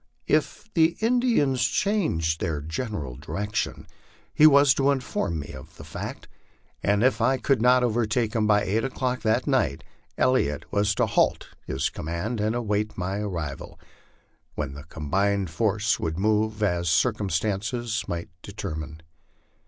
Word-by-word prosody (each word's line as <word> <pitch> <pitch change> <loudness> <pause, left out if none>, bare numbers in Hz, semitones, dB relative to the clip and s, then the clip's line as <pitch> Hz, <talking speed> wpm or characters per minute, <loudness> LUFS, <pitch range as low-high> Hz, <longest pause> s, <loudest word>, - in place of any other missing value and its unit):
If - - 0
the 165 0 +3
Indians 225 - +2
changed 105 - 0
their 80 -3 -1
general 80 - -4
direction, 100 +8 -3 0.5
he 155 - +7
was 140 -2 +6
to 135 +1 +2
inform 125 -11 -1
me 75 -1 -6
of 65 -1 -12
the - - -10
fact; - - -7 0.5
and 100 +2 +2
if 125 -3 +2
I 130 +3 +3
could 130 -1 +1
not 125 +1 +5
overtake 115 -1 0
him 110 -2 +1
by 105 -1 +4
eight 110 +4 0
o'clock 130 -1 -2
that 110 +3 +1
night, 125 - +1 0.3
Elliot 100 - +1
was 100 0 +1
to - - +2
halt - - +1 0.2
his 65 - -1
command 90 +8 -3
and 110 +2 0
await 105 -2 -1
my 95 +2 -2
arrival, 85 -9 -5 0.8
when 70 -3 -3
the 70 +2 -10
combined 95 +5 -1
force 105 +5 +1
would 80 0 -2
move 105 +1 +1
as 85 -4 +1
circumstances 110 +3 0
might 85 -1 -4
determine. 80 -6 -6
105 Hz, 145 wpm, -25 LUFS, 85-125 Hz, 0.8 s, he